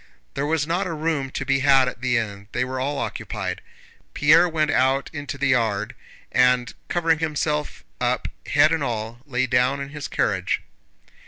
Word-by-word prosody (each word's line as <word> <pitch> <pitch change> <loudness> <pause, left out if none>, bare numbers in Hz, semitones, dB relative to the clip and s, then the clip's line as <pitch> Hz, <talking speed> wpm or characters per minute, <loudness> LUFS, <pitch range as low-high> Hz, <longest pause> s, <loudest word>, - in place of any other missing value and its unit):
There 140 +1 -2
was 155 -1 +1
not 175 +4 -1
a 170 - -3
room 155 -3 -1
to 140 - -4
be 135 0 +2
had 135 -2 +5
at 125 - -5
the 125 -1 +1
inn, 100 -3 -4
they 125 - 0
were 130 0 -4
all 140 +2 -1
occupied. - - -4 0.5
Pierre 165 +4 +5
went 155 -1 +1
out 135 +1 +2
into 145 -2 -5
the 140 0 0
yard 110 -5 +1 0.4
and, 125 -1 +3 0.2
covering 165 -2 +2
himself 150 -1 -2 0.2
up 125 0 0 0.2
head 150 +2 +4
and 165 -3 0
all, 115 -1 -3
lay 130 -1 0
down 125 +2 +2
in 140 0 -5
his 145 0 -6
carriage. 95 -3 0
135 Hz, 175 wpm, -23 LUFS, 125-150 Hz, 0.5 s, had